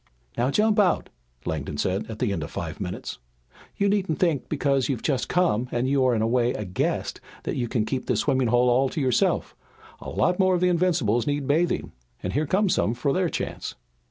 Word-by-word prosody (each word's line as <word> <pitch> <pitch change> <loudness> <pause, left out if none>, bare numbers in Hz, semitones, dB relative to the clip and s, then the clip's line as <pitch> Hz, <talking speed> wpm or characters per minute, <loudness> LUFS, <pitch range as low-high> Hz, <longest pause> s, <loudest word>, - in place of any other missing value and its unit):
"Now 120 +2 +1
jump 210 +7 +3
out," 190 -4 +2 0.4
Langdon 75 -2 -3
said 95 +8 -1
at 110 - -6
the 110 -3 0
end 85 - -3
of - - -6
five - - -5
minutes. - - -5 0.6
"You 200 - +2
needn't 195 -6 +1
think 165 -7 0
because 140 -3 +1
you've 130 -5 -2
just 135 -4 0
come 125 -10 +1
and 130 +3 0
are 130 -3 +3
in 110 - +1
a - - +2
way 120 +1 +2
a 105 - -4
guest, 90 -1 -2 0.2
that - - -3
you 120 -2 -1
can 110 -2 0
keep 125 +3 -3
this 120 -4 +1
swimming 130 -3 +1
hole 120 +2 +3
all 130 +2 +3
to - - -4
yourself. 130 -4 +1 0.4
A - - -7
lot 180 - +1
more 185 -1 +4
of 175 - -1
the 180 - +4
Invincibles 155 - +1
need 145 -1 0
bathing 160 +5 +1 0.3
and 90 - -2
here 150 +2 0
come 200 +6 +2
some 115 - +1
for 135 +3 0
their 185 -2 +1
chance." - - -4
130 Hz, 215 wpm, -25 LUFS, 120-170 Hz, 0.6 s, more